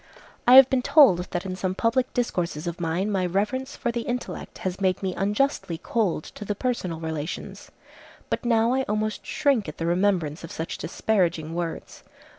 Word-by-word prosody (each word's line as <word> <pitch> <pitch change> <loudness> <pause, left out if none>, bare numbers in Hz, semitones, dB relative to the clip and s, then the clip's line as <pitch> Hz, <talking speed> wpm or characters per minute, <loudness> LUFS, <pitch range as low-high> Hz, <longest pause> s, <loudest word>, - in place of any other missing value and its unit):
I 250 - +9
have 265 -1 +10
been 265 -1 +1
told 255 - +6
that 180 0 -4
in 185 -1 -4
some 185 0 -2
public 240 +4 +1
discourses 180 - -2
of 170 0 -4
mine 175 +5 -1
my 190 -2 0
reverence 210 +9 -1
for 240 - -2
the 235 0 -2
intellect 245 +1 -5
has 185 +1 -3
made 185 0 +1
me 185 -1 -1
unjustly 205 - 0
cold 185 -2 -1
to - - -9
the 205 0 -3
personal 195 -9 -2
relations. 160 0 -5 0.6
But - - -2
now 230 0 +3
I 265 - +2
almost 215 +1 -2
shrink 275 - +1
at 155 - -9
the 165 - -3
remembrance 175 -4 +1
of 165 - -8
such 160 - -5
disparaging 170 -5 0
words. 170 -1 -5
195 Hz, 180 wpm, -25 LUFS, 170-235 Hz, 0.6 s, have